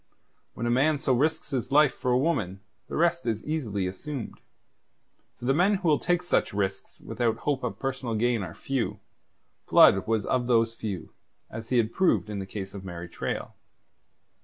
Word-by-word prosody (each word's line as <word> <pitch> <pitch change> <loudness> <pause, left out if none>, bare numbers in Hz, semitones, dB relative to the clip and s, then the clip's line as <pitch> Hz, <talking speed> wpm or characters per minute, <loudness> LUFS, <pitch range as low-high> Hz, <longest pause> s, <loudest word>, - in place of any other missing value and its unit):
When 115 - -3
a 120 - +1
man 145 +5 +3
so 130 -1 +1
risks 150 +6 0
his 130 -2 -2
life 150 0 +5
for 125 - -3
a 125 - +4
woman, 105 - 0 0.3
the - - -6
rest 170 -2 +1
is 110 -2 -1
easily 115 -11 -2
assumed. 115 +7 -6 1.0
For 120 - -8
the 135 - +3
men 185 +7 +3
who 190 -3 -2
will 150 -2 +4
take 175 0 +1
such 175 - 0
risks 95 -1 -3
without 115 -2 -1
hope 135 +1 -1
of 125 - -3
personal 130 -4 -3
gain 120 0 +1
are 85 -3 -6
few. 135 -4 -2 0.7
Blood 95 - +6
was 110 -2 +1
of 125 -2 0
those 115 -2 +3
few, 100 -7 -5 0.4
as 110 +1 -7
he 125 - +2
had 115 -1 +1
proved 180 - +2
in 100 - -3
the 95 - -5
case 95 -1 -6
of 100 -2 -8
Mary 90 -2 -7
Traill. - - -4
120 Hz, 185 wpm, -27 LUFS, 105-145 Hz, 1.0 s, Blood